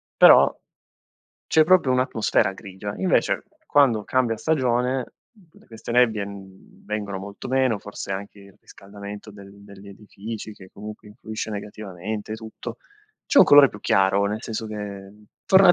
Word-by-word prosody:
però - - +7 0.9
c'è 155 - +4
proprio 180 -5 +4
un'atmosfera 110 -5 +1
grigia. 100 +2 -8
Invece, 185 - +1 0.2
quando 130 - +3
cambia 120 -2 0
stagione, 125 -2 0 0.6
queste 115 +1 -8
nebbie, 115 -4 +3
mhmm, 95 -1 -13
vengono 105 -2 -4
molto 100 +1 -9
meno 130 -4 +1
forse 100 0 -8
anche 100 +2 -7
il 100 -1 -17
riscaldamento 100 +1 -11
del 100 -1 -13
degli 100 0 -13
edifici 105 +2 -8
che, 95 -2 -15
comunque, 105 +1 -10
influisce 110 0 -7
negativamente 105 0 -6
e - - -2
tutto. 110 +2 -9 0.5
C'è 295 - +4
un - - +9
colore 145 -1 +8
più 105 - -12
chiaro, 95 +1 +2
nel 105 +3 -3
senso 110 -1 -5
che 100 -2 -7 0.3
torna 190 -1 +7
105 Hz, 140 wpm, -23 LUFS, 100-120 Hz, 0.9 s, un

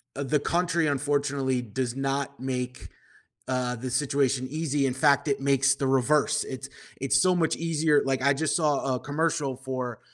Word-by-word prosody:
uh, 140 - -3
the 150 +2 +1
country, 170 +2 0
unfortunately 140 -2 0
does 120 +2 -3
not 135 +1 -2
make, 125 -1 -4 0.6
uh, 125 -1 -1
the 125 +2 -5
situation 135 -1 0
easy. 150 -2 -1
In 130 - 0
fact, 140 +3 +3
it 140 -1 0
makes 135 0 +3
the 140 - -2
reverse. 135 +3 +2
It's 130 +1 -7 0.3
it's 135 0 +3
so 185 +2 +3
much 165 -2 +1
easier 160 -3 +2
like, 135 -1 0
I 140 +2 +4
just 155 +2 -1
saw 145 -5 +1
a - - -3
commercial 150 -3 -1
for 130 -3 -5
135 Hz, 170 wpm, -26 LUFS, 130-150 Hz, 0.6 s, I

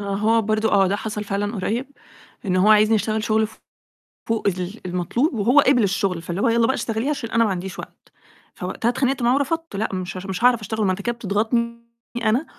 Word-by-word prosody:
آه، 200 -1 -3
هو 225 +2 +2
برضه 215 +1 +1
آه، 195 -1 +5
ده 195 +2 0
حصل 210 0 -4
فعلًا 205 +2 -2
قريب، 225 +7 -2 0.6
إن 185 -1 +1
هو 185 +3 +4
عايزني 215 +1 +5
اشتغل 215 0 -1
شغل 220 -1 +1 0.8
فوق 225 -2 -1
ال 185 +3 -2
المطلوب، 180 - 0
وهو 240 +5 +4
قبِل 260 -4 +4
الشغل 195 -3 0
فاللي 170 +3 -4
هو 235 - +3
يالّا 230 0 +3
بقى 265 - +2
اشتغليه 225 +4 -2
عشان 275 -6 -3
أنا 230 0 +3
ما 220 - +1
عنديش 190 0 -4
وقت، - - -12 0.4
فوقتها 230 - -2
اتخانقت 260 +1 0
معاه 240 +2 +3
ورفضت، 325 +1 -2
لأ 215 +3 -1
مش 185 0 -4
مش 190 +3 -5
هاعرف 245 -2 +5
أشتغل 215 +1 -2
ما 190 - +2
أنت 185 +2 -3
كده 240 +2 -2
بتضغطني 235 +2 -1 0.4
أنا 230 +7 +2
220 Hz, 205 wpm, -22 LUFS, 195-235 Hz, 0.8 s, آه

